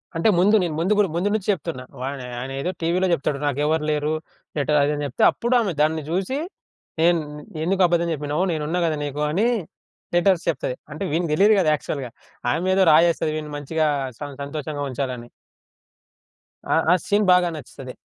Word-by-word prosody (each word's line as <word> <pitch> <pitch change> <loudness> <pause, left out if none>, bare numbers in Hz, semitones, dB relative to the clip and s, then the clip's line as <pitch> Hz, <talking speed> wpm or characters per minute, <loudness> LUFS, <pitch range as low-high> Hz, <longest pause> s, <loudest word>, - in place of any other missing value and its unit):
అంటే 165 +7 +3
ముందు 205 +4 +5
నేను 165 -3 -2
ముందు 185 +5 +2
గూడ 205 -2 +4
ముందు 180 +4 +1
నుంచి 215 -3 -2
జెప్తున్నా. 165 -8 -4 0.2
వా 130 - -2 0.3
ఆయన 130 +2 -5
ఏదో 180 +5 -1
టీవీలో 175 +3 +1
జెప్తాడు 140 -2 -1
నాకెవరు 150 +2 0
లేరు. 150 +1 0 0.4
లెటరు 150 +1 +2
అది 140 - +2
ఇది - - -1
అని 145 - -3
జెప్తే, 135 - -1
అప్పుడు 240 +2 -2
ఆమె 210 -6 0
దాన్ని 155 +1 +2
జూసి 190 +10 -1 0.6
నేను 170 0 +4 0.4
ఎందుకబద్ధం 175 -1 +2
జెప్పినవు 150 +4 -1
నేనున్నా 160 +2 -1
గదా! 160 - 0
నీకు 145 +1 -4
అని 200 +9 +2 0.7
లెటర్స్ 175 -1 +3
చెప్తాది. 130 -5 -2 0.2
అంటే 155 +6 -5
వీనికి 165 0 0
తెలీదు 205 +7 +5
గదా! 170 -5 +3
యాక్చువల్‌గా 135 -4 -5 0.4
ఆమె 180 +4 0
ఏదో 190 -1 +4
రాయేస్తది 160 0 +4
వీడిని 150 -1 -5
మంచిగా 155 +2 0 0.3
స - - -30 0.2
సంతోషంగా 145 0 -4
ఉంచాలని. 125 -2 -4 1.5
ఆ - - +4 0.2
ఆ - - +7
సీన్ 205 +1 +2
బాగా 180 -1 +4
నచ్చుతది. 130 -3 -9
160 Hz, 170 wpm, -23 LUFS, 145-180 Hz, 1.5 s, ఆ